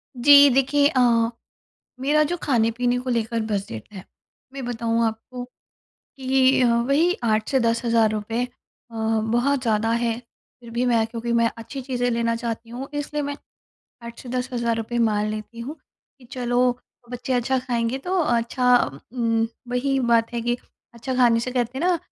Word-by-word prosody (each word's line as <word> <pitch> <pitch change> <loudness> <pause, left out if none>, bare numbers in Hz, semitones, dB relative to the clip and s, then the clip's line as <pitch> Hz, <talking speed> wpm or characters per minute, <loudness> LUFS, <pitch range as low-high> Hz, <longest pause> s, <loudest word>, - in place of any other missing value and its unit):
जी, 285 +3 +8
देखिए 275 +2 +3
अ, 270 -4 +1 1.0
मेरा 295 +3 +3
जो 345 +4 -2
खाने-पीने 245 -1 +1
को 255 +1 -4
लेकर 230 -1 -1
बजट 195 - -4
है, 190 -2 -9 0.5
मैं 270 -1 -6
बताऊँ 230 -1 0
आपको, 235 +3 -5 0.5
कि 265 0 +1
अ, 250 - +4
वही 280 +9 +2
8 215 -1 +1
से 265 - +2
₹10,000 230 -1 +1 0.5
अ, - - -11
बहुत 225 +5 +1
ज़्यादा 225 -2 +1
है। 230 -1 0 0.4
फिर 235 - -12
भी 240 +2 0
मैं 230 -2 +3
क्योंकि 230 +1 -4
मैं 230 0 +3
अच्छी 250 +4 -7
चीज़ें 245 -1 -1
लेना 230 0 0
चाहती 230 -1 -5
हूँ 250 +3 -6
इसलिए 290 0 -3
मैं 285 0 -3 0.7
8 235 0 -9
से 255 - -11
₹10,000 240 -2 -2
मान 210 -2 +2
लेती 215 +2 -7
हूँ 275 +7 -6 0.4
कि 260 - -18
चलो, 245 0 +1 0.3
बच्चे 250 +1 -4
अच्छा 255 +1 +1
खाएँगे 245 0 -1
तो 365 +7 -2
अच्छा 245 -1 +2
उ 135 +1 -9
उम, 230 -2 +1 0.2
वही 265 +2 0
बात 235 -1 +2
है 235 - -2
कि 240 +1 0 0.4
अच्छा 240 +3 -4
खाने 240 -2 +4
से 255 - -3
कहते 245 0 -1
हैं 320 - -2
ना 360 -2 +2
240 Hz, 165 wpm, -23 LUFS, 230-260 Hz, 1.0 s, जी